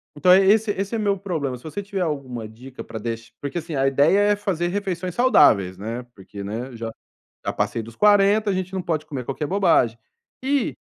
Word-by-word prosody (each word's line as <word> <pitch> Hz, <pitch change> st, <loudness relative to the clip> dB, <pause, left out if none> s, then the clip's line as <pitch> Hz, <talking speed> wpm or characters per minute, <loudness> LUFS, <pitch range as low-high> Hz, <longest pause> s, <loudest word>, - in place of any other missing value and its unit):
então 180 Hz, +5 st, +4 dB
é 190 Hz, +1 st, +7 dB
esse 210 Hz, +2 st, +4 dB
esse 200 Hz, +3 st, -3 dB
é -, -, 0 dB
meu 200 Hz, -2 st, +1 dB
problema. 155 Hz, -10 st, -3 dB
Se -, -, -20 dB
você 160 Hz, +6 st, -5 dB
tiver 195 Hz, -1 st, -4 dB
alguma 130 Hz, -8 st, -3 dB
dica 125 Hz, +4 st, -11 dB
pra 110 Hz, -, -8 dB
deixe 115 Hz, 0 st, -5 dB
porque, 140 Hz, +3 st, -4 dB
assim, 160 Hz, -2 st, -6 dB
a 135 Hz, 0 st, +2 dB
ideia 145 Hz, +8 st, +4 dB
é -, -, +3 dB
fazer 190 Hz, -5 st, -1 dB
refeições 185 Hz, -2 st, -3 dB
saudáveis, 100 Hz, -, +4 dB
né, 115 Hz, +5 st, -5 dB
porque, 100 Hz, +1 st, -9 dB
né, 120 Hz, +5 st, -5 dB
já 115 Hz, 0 st, -5 dB, 0.5 s
já -, -, -1 dB
passei 115 Hz, -, -1 dB
dos 115 Hz, +1 st, -12 dB
40, 205 Hz, 0 st, +4 dB
a -, -, +1 dB
gente 185 Hz, 0 st, -3 dB
não 185 Hz, -, -2 dB
pode 155 Hz, -3 st, -2 dB
comer 130 Hz, -5 st, -5 dB
qualquer 140 Hz, +3 st, -3 dB
bobagem 170 Hz, -, +2 dB, 0.4 s
e 275 Hz, -1 st, 0 dB
160 Hz, 210 wpm, -23 LUFS, 120-195 Hz, 0.5 s, é